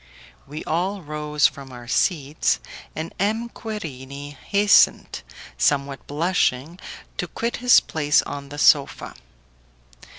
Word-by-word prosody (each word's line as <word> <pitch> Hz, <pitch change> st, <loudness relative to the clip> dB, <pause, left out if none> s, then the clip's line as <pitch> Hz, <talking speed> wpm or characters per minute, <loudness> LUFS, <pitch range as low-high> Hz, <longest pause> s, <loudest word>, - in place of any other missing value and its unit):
We 150 Hz, +3 st, -7 dB
all 185 Hz, +4 st, -2 dB
rose 150 Hz, -1 st, -1 dB
from 135 Hz, -1 st, -1 dB
our 120 Hz, -1 st, -10 dB
seats, 145 Hz, -, +1 dB, 0.4 s
and 160 Hz, +1 st, -5 dB
M. 220 Hz, +4 st, 0 dB
Querini 145 Hz, -, -7 dB
hastened, 200 Hz, +6 st, +3 dB, 0.4 s
somewhat 140 Hz, -1 st, 0 dB
blushing, 160 Hz, -1 st, 0 dB, 0.4 s
to 180 Hz, -, -2 dB
quit 230 Hz, +7 st, -3 dB
his 250 Hz, -1 st, +6 dB
place 150 Hz, 0 st, +1 dB
on 140 Hz, -1 st, -7 dB
the 145 Hz, -, -8 dB
sofa. 145 Hz, -1 st, +3 dB
150 Hz, 110 wpm, -23 LUFS, 140-185 Hz, 0.4 s, his